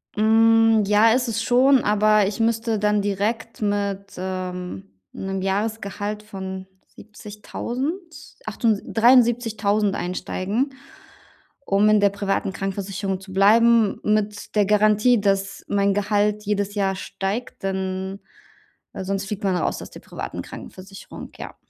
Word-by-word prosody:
Hm, 225 Hz, 0 st, +4 dB
ja, 210 Hz, +2 st, +5 dB
ist 250 Hz, +1 st, +1 dB
es 225 Hz, 0 st, -2 dB
schon, 255 Hz, +1 st, +4 dB
aber 210 Hz, 0 st, +3 dB
ich 200 Hz, +3 st, -3 dB
müsste 225 Hz, -1 st, 0 dB
dann 210 Hz, 0 st, +2 dB
direkt 215 Hz, +3 st, -2 dB
mit, 200 Hz, -1 st, -2 dB
ähm, 180 Hz, -, -5 dB, 0.2 s
'nem 195 Hz, 0 st, -4 dB
Jahresgehalt 210 Hz, +1 st, -3 dB
von 190 Hz, -2 st, -7 dB, 0.2 s
70.000, 260 Hz, -, -7 dB
achtunds 220 Hz, -1 st, 0 dB
73.000 225 Hz, -4 st, +3 dB
einsteigen, 200 Hz, +8 st, -2 dB, 0.9 s
um 200 Hz, +2 st, +3 dB
in 215 Hz, -1 st, +4 dB
der 200 Hz, -1 st, +4 dB
privaten 200 Hz, 0 st, -2 dB
Krankenversicherung 195 Hz, 0 st, -3 dB
zu 190 Hz, 0 st, -12 dB
bleiben 220 Hz, +2 st, +4 dB
mit 210 Hz, 0 st, -1 dB
der 205 Hz, -2 st, +4 dB
Garantie, 210 Hz, +3 st, +3 dB
dass 195 Hz, -1 st, -1 dB
mein 200 Hz, -1 st, +1 dB
Gehalt 210 Hz, +1 st, 0 dB
jedes 205 Hz, 0 st, -1 dB
Jahr 195 Hz, -2 st, 0 dB
steigt, 200 Hz, +6 st, -5 dB
denn 190 Hz, 0 st, -3 dB, 0.7 s
weil 190 Hz, -, -6 dB
sonst 195 Hz, 0 st, -2 dB
fliegt 205 Hz, 0 st, -5 dB
man 190 Hz, -2 st, +1 dB
raus -, -, -1 dB
aus -, -, -10 dB
der -, -, -12 dB
privaten -, -, -7 dB
Krankenversicherung, 195 Hz, +1 st, -11 dB
ja. -, -, -8 dB
205 Hz, 125 wpm, -22 LUFS, 195-225 Hz, 0.9 s, ja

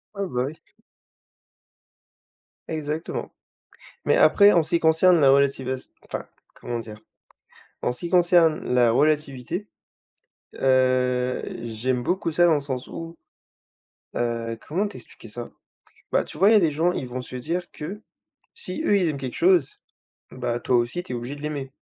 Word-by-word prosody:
Ouais, 200 Hz, -, -2 dB
bah, 125 Hz, -5 st, -1 dB
oui. 145 Hz, -, -5 dB, 2.2 s
Exactement, 155 Hz, 0 st, -4 dB, 0.7 s
mais -, -, +4 dB
après 205 Hz, 0 st, +6 dB
en 170 Hz, -, +4 dB
ce 160 Hz, -, -7 dB
qui 170 Hz, -, +2 dB
concerne 165 Hz, +1 st, +5 dB
la 135 Hz, -, +6 dB
relativas 135 Hz, -2 st, +1 dB
enfin -, -, -6 dB, 0.3 s
comment 120 Hz, -1 st, -5 dB
dire? 110 Hz, -2 st, -8 dB, 0.8 s
En 125 Hz, -, 0 dB
ce -, -, -10 dB
qui 170 Hz, -, -4 dB
concerne 175 Hz, -3 st, +4 dB
la 120 Hz, -2 st, +4 dB
relativité. 150 Hz, -, 0 dB, 0.9 s
Heu, 130 Hz, -1 st, +2 dB, 0.2 s
j'aime 120 Hz, +2 st, -2 dB
beaucoup 180 Hz, +5 st, -1 dB
ça 175 Hz, +2 st, +4 dB
dans 165 Hz, -, +5 dB
le 145 Hz, -, 0 dB
sens 130 Hz, -2 st, -5 dB
où, 165 Hz, 0 st, -8 dB, 1.0 s
heu, 115 Hz, -1 st, -2 dB
comment 190 Hz, +7 st, 0 dB
t'expliquer 200 Hz, -, -12 dB
ça? 120 Hz, +2 st, -7 dB, 0.6 s
Bah, -, -, +3 dB
tu -, -, -9 dB
vois, 195 Hz, +4 st, +5 dB
il -, -, +6 dB
y -, -, +7 dB
a 210 Hz, -, +7 dB
des 165 Hz, -4 st, +2 dB
gens, 165 Hz, +4 st, +1 dB
ils 130 Hz, -, -4 dB
vont 125 Hz, +1 st, -5 dB
se 125 Hz, -, -9 dB
dire 175 Hz, +7 st, -3 dB
que, 195 Hz, +8 st, -7 dB, 0.5 s
si -, -, -5 dB
eux 205 Hz, -, +4 dB
ils 180 Hz, -4 st, +2 dB
aiment 145 Hz, -, -3 dB
quelque 130 Hz, -2 st, -5 dB
chose, 175 Hz, -5 st, +3 dB, 0.5 s
bah, 120 Hz, -1 st, -3 dB
toi 125 Hz, -, +1 dB
aussi 120 Hz, +9 st, -1 dB
tu -, -, -9 dB
es -, -, -2 dB
obligé 120 Hz, +4 st, -5 dB
de 145 Hz, -, -12 dB
l'aimer. 145 Hz, -3 st, -4 dB
145 Hz, 165 wpm, -24 LUFS, 125-170 Hz, 2.2 s, y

